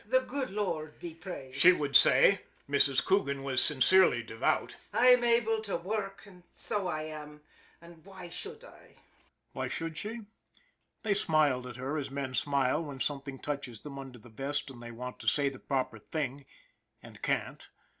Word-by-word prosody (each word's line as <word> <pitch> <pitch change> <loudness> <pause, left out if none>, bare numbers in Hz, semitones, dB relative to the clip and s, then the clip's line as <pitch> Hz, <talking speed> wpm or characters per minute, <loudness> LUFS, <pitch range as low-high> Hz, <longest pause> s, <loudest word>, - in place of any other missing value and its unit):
" - - -30
The 260 +3 +4
good 265 +1 -4
Lord 170 -7 -3
be 170 -2 -7
praised," 140 -6 -8
she 180 +5 +9
would 145 -5 -2
say 185 +9 +7 0.3
Mrs. 140 -2 +3
Coogan 140 -9 +1
was 130 -2 +1
sincerely 150 -2 +4
devout. 110 0 -1
" - - -33
I'm 250 0 +6
able 230 -2 +3
to 205 -4 -2
worrk, 195 +1 -4 0.2
so 200 -3 -2
I 155 -3 -2
am, 150 -1 -8 0.4
an' 170 - -12
f 170 - -16
why 185 -2 -10
should 440 - -7
I? - - -16 0.3
" - - -40
Why - - -2
should 165 -1 -4
she? 225 +3 -5 0.8
They 215 -3 +2
smiled 150 -9 +2
at 125 - -8
her 135 +5 -3
as 140 - -4
men 135 -1 -4
smile 140 +2 +1
when 140 -4 -7
something 140 -1 -3
touches 140 -6 -5
them 140 -2 -8
under 135 -2 -9
the 120 +1 -15
vest, 135 +4 -3
and 120 -2 -12
they 120 - -8
want 125 +2 -7
to - - -9
say 145 -1 +3
the 135 - -11
proper 130 -5 -2
thing 140 +1 -4 0.6
and - - -13
can't. - - -2
150 Hz, 185 wpm, -31 LUFS, 135-190 Hz, 0.8 s, she